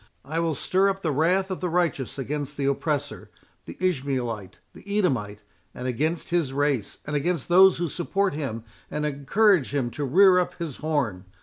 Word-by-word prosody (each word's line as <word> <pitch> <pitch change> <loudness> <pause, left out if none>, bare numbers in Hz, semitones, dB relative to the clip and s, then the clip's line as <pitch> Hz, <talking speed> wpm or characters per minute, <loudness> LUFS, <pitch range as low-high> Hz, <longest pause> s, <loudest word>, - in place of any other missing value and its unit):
I 155 +4 -2
will 165 -2 0
stir 190 +7 +2
up 195 0 -3
the 160 - +1
wrath 180 +7 +1
of 185 - -3
the 180 - -1
righteous 165 -7 -1
against 145 +1 -4
the 140 - -1
oppressor—the 140 +1 -4
Ishmaelite—the 135 - -3
Edomite—and 125 - -3
against 155 +9 -2
his 170 -6 +1
race, 140 -6 0
and 150 - -3
against 165 +1 -1
those 190 +2 +7
who 175 0 -1
support 190 +4 -1
him 135 -7 -4 0.3
and 150 0 -2
encourage 150 - +2
him 125 -4 0
to 145 - -4
rear 180 +7 +6
up 180 - -2
his 165 -6 -5
horn. 130 -12 -2
150 Hz, 165 wpm, -25 LUFS, 135-180 Hz, 0.3 s, those